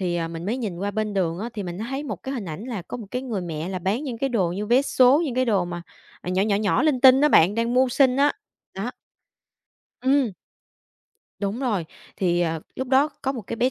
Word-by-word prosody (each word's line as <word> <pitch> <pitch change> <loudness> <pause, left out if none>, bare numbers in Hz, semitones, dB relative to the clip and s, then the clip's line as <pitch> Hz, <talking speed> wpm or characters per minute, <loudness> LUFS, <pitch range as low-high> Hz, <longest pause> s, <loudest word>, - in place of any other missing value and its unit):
Thì, 175 -2 -1
ờ, 165 -1 -2
mình 165 +2 -6
mới 235 +5 0
nhìn 205 -9 -4
qua 200 +1 -2
bên 215 0 -2
đường 170 -3 0
á, 225 +4 -4
thì 205 - -3
mình 175 0 -6
thấy 270 +6 -4
một 295 - -6
cái 270 +1 -4
hình 230 - -4
ảnh 170 +5 -6
là 225 -8 -5
có 245 - -7
một 225 -4 -8
cái 250 - -3
người 230 -7 -3
mẹ 165 -1 -4
là 185 -1 -3
bán 200 - -1
những 240 -5 -5
cái 275 - 0
đồ 190 -8 0
như 205 +3 -3
vé 250 +4 +4
số, 265 +3 +4
những 260 -5 -3
cái 255 - +2
đồ 200 -7 +2
mà, 175 -1 -6 0.4
ờ, 180 - -5
nhỏ, 185 +1 +2
nhỏ, 205 -1 +2
nhỏ, 205 +5 +1
linh 295 -5 +2
tinh 265 +1 +8
á 300 - +5
bạn, 185 - +5
đang 230 +1 0
mưu 260 0 +4
sinh 260 0 +3
á, 285 +1 +4 0.4
đó. 200 +6 -3 1.1
Ừm. 265 -3 +3 1.1
Đúng 205 +5 -2
rồi. 210 -10 0 0.3
Thì, 175 -2 +1
ờ, 165 -2 0 0.2
lúc 260 -1 -3
đó 275 +3 +4
có 270 - 0
một 235 -5 -6
cái 230 - -4
bé 250 +3 +2
220 Hz, 255 wpm, -24 LUFS, 185-255 Hz, 1.1 s, tinh